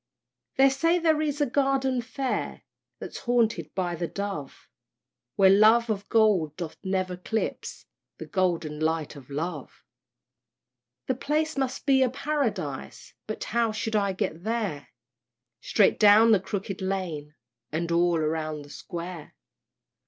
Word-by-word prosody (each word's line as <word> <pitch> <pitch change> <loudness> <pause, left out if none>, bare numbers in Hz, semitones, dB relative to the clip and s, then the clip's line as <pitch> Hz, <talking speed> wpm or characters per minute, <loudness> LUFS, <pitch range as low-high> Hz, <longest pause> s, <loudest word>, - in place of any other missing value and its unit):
They 270 +1 +6
say 330 +6 +2
there 320 -3 +2
is 295 -1 -1
a - - +4
Garden 270 -1 +1
fair, 260 +2 -3 0.3
That's - - -7
haunted 230 - +1
by 180 -2 -1
the 170 0 -3
dove, 195 -9 -6 0.7
Where 190 -1 +6
love 220 +3 +5
of 200 -1 -4
gold 205 -10 +3
doth 170 -3 -5
ne'er 190 -1 0
eclipse 200 +5 -4 0.3
The - - -7
golden 170 -6 -1
light 160 -1 -1
of 140 -2 -13
love 150 0 -5 1.2
The - - 0
place 305 +4 -1
must 265 -2 -2
be 270 -1 +4
a 260 - +4
Paradise, 230 - -3
But 215 - -4
how 230 0 0
shall 215 0 0
I 200 -1 0
get 185 -4 -3
there? 215 -9 -2 0.7
"Straight 205 - +2
down 215 +2 +7
the 210 - +5
Crooked 195 0 -5
Lane, 175 -6 -3 0.4
And 170 +2 -2
all 170 0 +3
round 155 -1 -2
the 145 - -14
Square." 175 -2 -7
200 Hz, 140 wpm, -26 LUFS, 170-245 Hz, 1.2 s, down